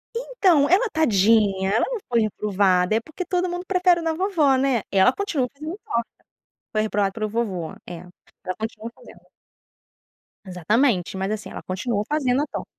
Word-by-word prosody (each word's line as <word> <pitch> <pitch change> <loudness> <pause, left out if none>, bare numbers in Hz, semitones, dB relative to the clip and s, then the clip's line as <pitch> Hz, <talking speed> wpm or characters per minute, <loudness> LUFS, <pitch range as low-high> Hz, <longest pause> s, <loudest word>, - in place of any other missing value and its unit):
Então 380 - +2
ela 405 +7 +4
tadinha. 205 - +2
Ela - - +2
não - - -3
foi 235 -2 +2
reprovada 200 -2 +1
é - - +3
porque 315 +7 -7
todo 360 0 -1
mundo 355 +1 -5
prefere 360 -2 +3
a - - -6
da 325 -1 0
vovó, 325 -7 +2
né. 260 -4 +1
Ela 195 +5 +5
continua 340 -11 -1
fazendo 310 +6 -7
torta 235 0 -2 0.7
foi 215 - +1
reprovada 205 -2 0
pelo 215 +1 -3
vovô 200 -7 -3
é, 175 - -7 0.5
ela 185 0 -3
continua 220 +1 -6
fazendo. - - -17 1.2
Exatamente 190 - 0
mas 190 +2 -2
assim 215 -1 -5
ela - - -8
continua 205 +3 -2
fazendo 275 -3 +1
a - - 0
tor - - -5
235 Hz, 170 wpm, -23 LUFS, 200-320 Hz, 1.2 s, Ela